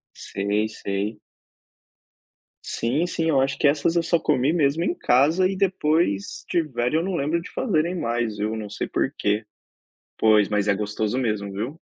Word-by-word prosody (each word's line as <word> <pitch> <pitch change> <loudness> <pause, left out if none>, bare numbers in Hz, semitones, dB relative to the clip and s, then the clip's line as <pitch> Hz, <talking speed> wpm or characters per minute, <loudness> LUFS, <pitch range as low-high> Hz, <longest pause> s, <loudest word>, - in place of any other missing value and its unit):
Sei, 105 +2 -1
sei. 105 +1 -4 1.5
Sim, 140 +9 0
sim 165 -2 -1
eu 140 -4 +3
acho 135 0 -1
que 145 - +4
essas 155 +3 +1
eu 170 - +2
só 170 0 +2
comi 145 -2 +1
mesmo 155 0 +2
em 350 - 0
casa 155 - +3
e 195 - -2
depois 160 - 0
tiveram 150 -3 0
eu - - -2
não 190 -1 -2
lembro 155 +2 0
de - - -10
fazerem 175 -7 0
mais 115 - -2
viu, 110 +2 -1
não 105 -2 -6
sei - - -4
porquê. 105 +1 -1 0.7
Pois, 110 -2 +4
mas 105 -1 0
é 100 - +3
gostoso 105 +3 -2
mesmo, 105 -5 -1
viu! 120 +11 -4
130 Hz, 165 wpm, -24 LUFS, 105-165 Hz, 1.5 s, que